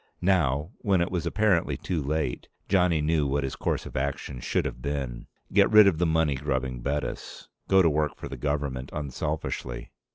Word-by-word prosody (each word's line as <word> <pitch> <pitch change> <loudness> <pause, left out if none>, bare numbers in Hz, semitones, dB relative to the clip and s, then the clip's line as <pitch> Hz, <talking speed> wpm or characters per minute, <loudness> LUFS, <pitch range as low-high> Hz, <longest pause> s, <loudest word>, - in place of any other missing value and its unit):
Now, 80 -4 +2
when 100 -4 +2
it 85 - 0
was 90 -2 -1
apparently 105 -6 +2
too 85 -4 -2
late, 75 -2 -2 0.2
Johnny 90 -5 +3
knew 75 -2 +2
what 70 +1 0
his 65 - -3
course - - -2
of - - -9
action 65 -1 -3
should - - -1
have - - -5
been. 65 -3 -4 0.3
Get - - +5
rid 105 -1 +8
of 90 -5 +3
the 85 - +2
money 80 -2 +2
grubbing 65 -2 -2
Bettis. 70 +3 -4 0.2
Go 95 -1 +5
to 85 - +5
work 75 0 0
for - - -7
the - - -6
government 70 -1 -2
unselfishly. 70 -3 -4
75 Hz, 185 wpm, -27 LUFS, 65-85 Hz, 0.3 s, rid